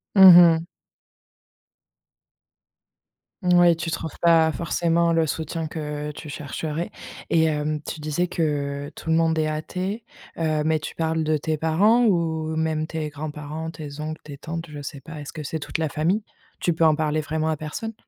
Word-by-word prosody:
Mmh 190 -3 +11 0.2
mh. 165 - -8 2.8
Moui, 175 -1 +5
tu 165 +1 -4
trouves 165 -1 -4
pas 165 -2 +5
forcément 170 +1 +1
le 165 -1 +3
soutien 160 +1 -3
que 150 -2 -4
tu 150 +1 -9
chercherais. 150 +3 -4 0.4
Et 160 -1 +4
hem, 150 -1 -1
tu 155 - -6
disais 155 +4 -1
que 145 -4 -2
tout 160 - -7
le 160 - +4
monde 165 -1 +3
est 155 - +1
athée, 185 +8 -3 0.3
heu, 155 -2 0
mais 155 0 +2
tu 150 - -6
parles 160 -1 -1
de 155 0 +1
tes 155 +1 -2
parents? 205 +10 +3
Ou 160 -5 0
même 160 -1 0
tes 155 -1 -4
grands-parents? 150 +2 -6
Tes 150 -2 -8
oncles? 155 +1 -5
Tes 145 -2 -9
tantes? 165 +3 -5
Je 145 -1 -8
sais 140 -1 -7
pas. 165 -2 -9
Est-ce 145 - -8
que 155 - -6
c'est 155 +2 -4
toute 155 - -4
la 160 - 0
famille? 170 +9 0 0.4
Tu 175 - +1
peux 165 0 +2
en 155 -1 +5
parler 155 0 0
vraiment 155 +1 -1
à 155 - 0
personne? 190 +9 -5
160 Hz, 175 wpm, -24 LUFS, 150-165 Hz, 2.8 s, Mmh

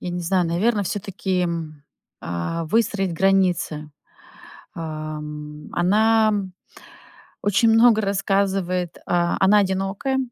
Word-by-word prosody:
Я 180 - -5
не 175 0 -3
знаю, 175 0 +1
наверное, 205 +6 +1
всё-таки 190 -1 -2
м, 160 -4 -4 0.4
э, 85 - -3
выстроить 195 0 0
границы. 175 -5 +1 0.8
Эм, 150 -1 -7
она, 220 +5 +3
м, 195 -3 -3 0.9
очень 205 +3 +3
много 225 -1 +5
рассказывает. 195 -3 -1
А, 175 0 +1
она 195 +2 +5
одинокая, 195 +7 -1
185 Hz, 105 wpm, -22 LUFS, 165-200 Hz, 0.9 s, много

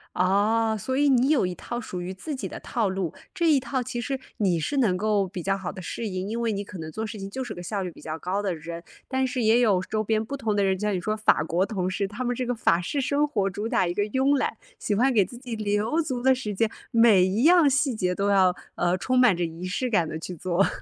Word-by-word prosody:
哦， 215 +4 +2
所 260 +6 -2
以 290 +1 +3
你 260 -1 +4
有 280 -11 +3
一 180 - -3
套 240 +6 -5
属 185 -6 -6
于 180 +1 -4
自 290 +11 -5
己 265 - -4
的 - - -7
套 230 -5 -1
路。 190 -4 -2 0.2
这 335 -1 +2
一 280 - +4
套 260 0 -2
其 245 -1 -4
实 270 +2 -2 0.2
你 185 -5 +2
是 280 - -1
能 210 -9 +3
够 205 0 +1
比 180 -1 -6
较 195 +3 0
好 190 -2 -5
地 - - -8
适 225 +6 -4
应， 185 0 -4
因 230 +2 -3
为 230 -1 0
你 200 0 -3
可 200 -2 -10
能 160 -1 -6
做 220 +7 -4
事 215 0 -7
情 195 0 -6
就 260 +5 -4
是 - - -6
个 175 - -8
效 200 +2 -3
率 180 - -4
比 - - -15
较 160 0 -5
高 190 +4 -2
的 195 -3 -1
人。 170 +1 -7 0.2
但 260 0 0
是 255 -1 -2
也 225 +2 +4
有 205 -6 +3
周 215 +3 -2
边 220 +1 0
不 280 +5 -5
同 220 -6 -1
的 200 - +2
人， 190 -1 +1
像 210 +1 -1
你 180 - -1
说 215 +4 -1
法 215 -7 +3
国 170 +3 +1
同 190 -3 -2
事， 195 +1 -1
他 210 +6 -5
们 245 0 0
这 255 - -2
个 245 - 0
法 170 -6 +2
式 275 +11 -2
生 285 +2 +1
活 205 -8 0
主 205 +3 -4
打 235 -6 +2
一 175 - -2
个 205 - +1
庸 265 +6 +2
懒， - - -1 0.2
喜 210 - -1
欢 255 +6 +3
给 210 -5 +4
自 240 - -10
己 245 -2 -6
留 215 +7 0
足 260 -6 -3
的 265 +1 +5
时 215 -5 -4
间， 225 +3 +2 0.2
每 230 -5 +6
一 195 +5 0
样 340 -2 +6
细 270 -1 +2
节 180 -4 0
都 200 +2 0
要， 185 -2 +4 0.2
呃， 175 +1 +1
充 255 +7 0
满 245 -7 +5
着 175 - -1
仪 165 +2 -6
式 225 +8 -1
感 175 -7 +2
地 155 - -4
去 180 +3 -6
做。 180 +3 +1
210 Hz, 305 characters per minute, -25 LUFS, 185-245 Hz, 0.2 s, 每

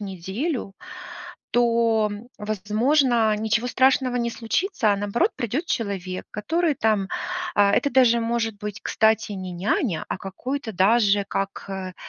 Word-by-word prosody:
неделю, 195 - -4 0.8
то, 230 -3 +2 0.3
возможно, 220 +3 +2
ничего 220 +2 0
страшного 260 0 +3
не 235 -1 0
случится, 230 - 0
а - - 0
наоборот, 205 - +1
придет 255 - -2
человек, 195 - -3
который 320 +9 0
там, 215 -5 +1 0.5
а, 200 -1 +4
это 280 +3 +2
даже 240 -2 +4
может 230 -2 -1
быть, 210 -1 -6
кстати, 220 -1 +2
не 185 -2 -6
няня, 180 - -1
а - - -2
какой-то 235 +5 -5
даже 200 +1 +3
как, 195 0 -3
э, 190 -1 -5
220 Hz, 130 wpm, -24 LUFS, 200-245 Hz, 0.8 s, а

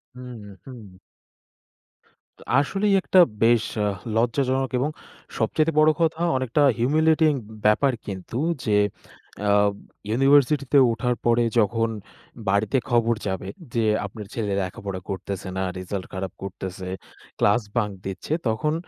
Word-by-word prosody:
হুম, 125 -2 -9 0.3
হুম। 115 -8 -11 1.4
তো - - -19 0.2
আসলেই 195 +7 +1
একটা 185 - +3 0.2
বেশ 115 -1 +4 0.2
আ - - +1 0.3
লজ্জাজনক 130 +3 +1
এবং 140 +4 0 0.5
সবচাইতে 155 +1 +1
বড় 155 0 +6
কথা 160 0 +1 0.2
অনেকটা 130 +3 0 0.2
হিউমিলিয়েটিং 155 +4 +3 0.3
ব্যাপার 130 +5 +4
কিন্তু 100 +4 -6 0.3
যে 105 -2 +3 0.7
আ - - +5 0.6
ইউনিভার্সিটিতে 140 +3 +3
উঠার 120 +2 -1
পরে 120 0 +3 0.2
যখন 115 +2 +1 0.6
বাড়িতে 100 +6 +2
খবর 115 -1 +2
যাবে 95 0 -3 0.3
যে 115 -1 +1 0.2
"আপনার 105 +1 -8
ছেলে 105 -3 -2
লেখাপড়া 95 +1 -5
করতেছে 95 0 -5
না, 95 - 0
রেজাল্ট 95 +1 -5
খারাপ 95 -1 -4
করতেছে, 95 -1 -6 0.5
ক্লাস 105 +4 +3 0.2
বাঙ্ক 105 -3 0
দিচ্ছে।" 95 +10 -4
তখন 130 +8 0
115 Hz, 120 wpm, -24 LUFS, 100-140 Hz, 1.4 s, বড়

